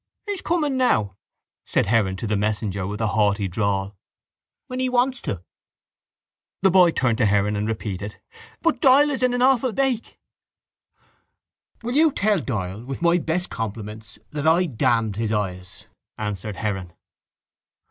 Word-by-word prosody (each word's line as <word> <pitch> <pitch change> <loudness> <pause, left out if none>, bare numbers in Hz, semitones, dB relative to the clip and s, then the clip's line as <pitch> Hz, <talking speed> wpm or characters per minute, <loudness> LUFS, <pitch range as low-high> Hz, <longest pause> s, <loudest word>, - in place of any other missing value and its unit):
—He's 405 -3 -3
coming 300 -6 0
now, 110 - +2 0.5
said - - +1
Heron 100 -3 +2
to 95 - -5
the 105 -1 0
messenger 105 -2 -1
with 105 +3 -5
a 110 - +1
haughty 100 -1 +1
drawl, 100 +1 -1 0.7
when 255 0 -5
he 255 0 +1
wants 250 +1 +1
to. 90 -3 -4 1.2
The 190 - +5
boy 180 -1 +6
turned 120 -8 0
to 115 - +4
Heron 105 +1 +2
and 105 +1 -1
repeated: 105 -2 -4 0.4
—But 330 -1 +1
Doyle 285 +1 +6
is 265 -4 -3
in 255 -1 +3
an 245 - +1
awful 260 -1 +3
bake. 265 -3 -1 1.7
—Will 240 +2 -2
you 315 +1 +5
tell 210 -5 +1
Doyle 105 - -4
with 135 +5 -6
my 170 +1 +4
best 175 +3 -2
compliments 110 -1 -6
that 150 +1 -2
I 170 +3 +4
damned 115 - 0
his 110 -1 -1
eyes? 90 -4 -4 0.3
answered 105 -1 -4
Heron. 95 -5 -3
110 Hz, 150 wpm, -23 LUFS, -, 1.7 s, boy